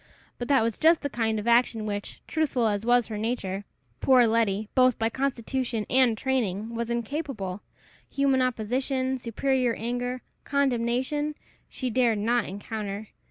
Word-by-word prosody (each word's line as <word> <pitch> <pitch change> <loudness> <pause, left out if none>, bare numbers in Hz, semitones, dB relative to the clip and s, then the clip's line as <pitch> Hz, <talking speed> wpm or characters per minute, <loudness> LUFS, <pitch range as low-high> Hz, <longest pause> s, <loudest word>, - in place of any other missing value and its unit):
But 240 - -3
that 270 -4 +4
was 230 -2 -2
just 325 +1 +5
the 285 - -3
kind 225 -3 0
of 210 +2 -4
action 235 -1 +3
of - - -4
which, 205 -1 -5
truthful 290 -7 0
as 210 +1 0
was 245 -1 +4
her 215 -2 -5
nature, 205 -4 -2 0.3
poor 255 -2 +5
Letty, 220 -2 +1
both 255 -2 +4
by 225 0 +1
constitution 250 -3 -2
and 255 -4 +4
training, 225 -5 -1
was 230 0 -3
incapable; 235 - -3 0.5
human 275 -2 +2
opposition, 255 +2 -1
superior 250 +1 0
anger, 245 +2 -3 0.2
condemnation, 275 +2 0 0.3
she 255 -2 -3
dared 235 -2 +3
not 230 +2 +1
encounter. 205 +1 -5
240 Hz, 150 wpm, -27 LUFS, 220-260 Hz, 0.5 s, just